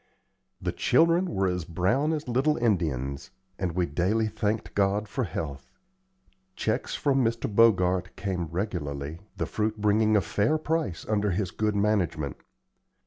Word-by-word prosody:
The - - -2
children 170 +3 +3
were 95 - 0
as 90 -1 -1
brown 95 - +1
as 155 -2 -3
little 135 +5 +2
Indians, 75 - -1 0.3
and 90 -3 -1
we 90 0 +1
daily 95 +9 +1
thanked 110 0 -2
God 100 +1 +1
for 130 +3 -2
health. 70 -5 -5 0.9
Checks - - -1
from 135 -2 +2
Mr. 115 0 0
Bogart 95 -4 +3
came 95 -3 -2
regularly, 80 -4 -4 0.2
the - - -1
fruit 110 0 -2
bringing 105 +1 +3
a - - +3
fair 100 - +1
price 155 - -2
under 105 -1 +1
his 95 0 -1
good 105 -1 -1
management. 95 -9 0
100 Hz, 140 wpm, -27 LUFS, 90-115 Hz, 0.9 s, children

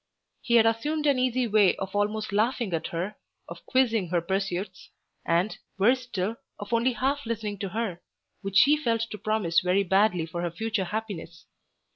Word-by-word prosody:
He 235 - +1
had 230 -1 +6
assumed 295 +8 0
an 280 -3 +3
easy 255 0 +1
way 210 -4 +4
of 195 +1 -6
almost 210 +1 -1
laughing 220 -1 0
at 160 -1 -1
her, 185 +5 -4 0.3
of - - -10
quizzing 230 -7 +2
her 175 0 +2
pursuits, 190 +1 -3 0.3
and, 175 +5 +1 0.2
worse 245 +6 +3
still, 230 -3 -3 0.2
of 205 +2 -7
only 235 +2 +2
half 275 +5 -1
listening 215 -3 -3
to 200 -2 -3
her, 200 -4 -3 0.4
which 195 -1 -1
she 290 +8 +7
felt 230 -6 0
to 210 - -5
promise 205 -5 +1
very 185 +2 +2
badly 190 -2 +2
for 170 +1 -5
her 175 - -1
future 220 +3 -2
happiness. 195 -5 -6
210 Hz, 175 wpm, -27 LUFS, 185-230 Hz, 0.4 s, she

